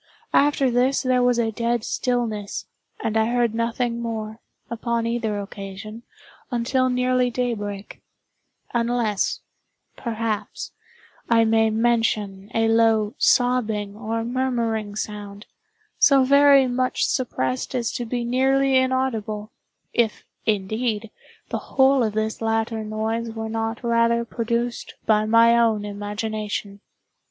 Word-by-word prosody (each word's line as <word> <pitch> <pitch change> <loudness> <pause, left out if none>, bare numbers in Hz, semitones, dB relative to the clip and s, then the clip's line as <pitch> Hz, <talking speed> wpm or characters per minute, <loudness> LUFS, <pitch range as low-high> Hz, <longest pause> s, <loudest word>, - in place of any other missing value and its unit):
After 280 -2 +3
this 255 +3 +2
there 255 -1 +2
was 245 -1 +3
a 225 -2 +1
dead 235 +1 -1
stillness, 230 -6 -2 0.4
and 220 - -1
I 220 0 +3
heard 240 -2 +1
nothing 235 +1 -1
more, 220 -1 -4 0.3
upon 235 0 -2
either 230 -3 -1
occasion, 200 +2 -8 0.5
until 255 +1 +1
nearly 250 0 +2
daybreak; 210 -5 -4 0.7
unless, 235 -3 0 0.5
perhaps, 225 -2 -3 0.6
I 230 -1 +5
may 225 0 +3
mention 215 -3 0
a 225 0 +3
low 225 -1 +3
sobbing, 220 -5 +2
or 225 +1 -3
murmuring 230 -4 -1
sound, 205 -1 -6 0.5
so 275 -3 +6
very 280 0 +6
much 255 0 0
suppressed 130 - -2
as 235 -3 -1
to 245 - -3
be 240 +1 -3
nearly 265 +2 +2
inaudible—if, 235 -3 -2 0.2
indeed, 215 +2 -1 0.4
the - - -2
whole 270 0 +3
of 220 -3 0
this 220 +1 -2
latter 225 0 -1
noise 220 +2 -2
were 225 0 -5
not 225 +1 -3
rather 235 0 +2
produced 235 +1 -3
by 215 -1 +3
my 230 +1 +5
own 225 -3 +2
imagination. 205 0 -4
230 Hz, 115 wpm, -23 LUFS, 215-245 Hz, 0.7 s, so